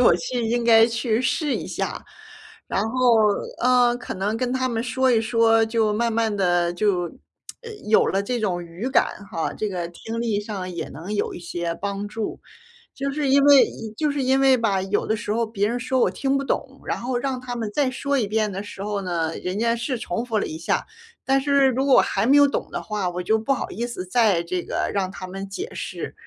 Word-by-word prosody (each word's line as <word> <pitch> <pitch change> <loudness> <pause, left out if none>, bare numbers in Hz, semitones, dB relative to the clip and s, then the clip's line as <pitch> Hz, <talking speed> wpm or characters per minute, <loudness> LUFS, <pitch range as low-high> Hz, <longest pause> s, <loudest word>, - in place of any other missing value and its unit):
我 250 - +6
去 245 -3 -2
应 240 +1 0
该 225 -1 +6
去 230 -1 0
试 295 +3 0
一 - - -4
下， - - -4 0.6
然 195 - 0
后， 250 -2 +4 0.4
呃， 245 -1 +4
可 245 - -6
能 205 +4 -1
跟 250 +1 -1
他 260 0 0
们 230 -2 -1
说 260 +2 +1
一 230 - +4
说， 225 0 +3
就 220 -1 +1
慢 230 +1 0
慢 220 -2 +1
地 175 -2 +2
就 185 -3 +1 0.6
呃， 460 -1 -8 0.2
有 220 - +5
了 195 +1 0
这 245 +4 -2
种 185 -5 -1
语 175 +8 -5
感 205 - +1
哈， 165 - -2
这 215 - -2
个 175 -2 -3
听 225 +6 -6
力 225 -3 0
上 205 -3 -5
也 170 -2 -5
能 170 +9 -6
有 - - -1
一 - - -8
些 170 -1 -3
帮 200 +2 -4
助。 215 0 -5 0.5
就 275 0 -3
是 285 -1 -1
因 280 +1 +5
为 285 -2 +8 0.3
就 300 -2 +1
是 285 -1 -2
因 265 +1 +2
为 265 -1 +5
吧， 205 -5 +1
有 195 +2 -1
的 220 - +1
时 210 0 -3
候 230 0 +1
别 205 -2 -1
人 240 +2 -2
说 260 +1 0
我 - - +3
听 275 0 0
不 275 - -2
懂， 275 0 -3
然 - - -2
后 245 +1 -2
让 260 0 -2
他 245 -1 -6
们 225 -3 -3
再 280 -3 +2
说 280 +2 -1
一 215 - 0
遍 215 0 0
的 195 +1 -4
时 200 -1 -8
候 205 -1 -2
呢， 165 -3 -2
人 180 +2 -3
家 230 +1 +2
是 240 +2 -2
重 225 +2 -3
复 225 -3 -1
了 - - -1
一 155 - -6
下， 165 - -1 0.4
但 270 +1 +2
是 280 -1 +3
如 265 +2 0
果 270 - +5
我 - - +7
还 195 +2 0
没 280 - +5
有 285 0 +7
懂 280 - -1
的 - - -5
话， 210 -4 -2
我 180 0 -4
就 220 +4 +2
不 250 +5 +1
好 - - -4
意 235 +2 -3
思 185 -6 -5
再 195 -4 +2
这 180 +1 -2
个 - - -2
让 195 -2 0
他 185 - -8
们 195 +2 -6
解 365 - -5
释。 - - -5
225 Hz, 250 characters per minute, -23 LUFS, 195-255 Hz, 0.6 s, 为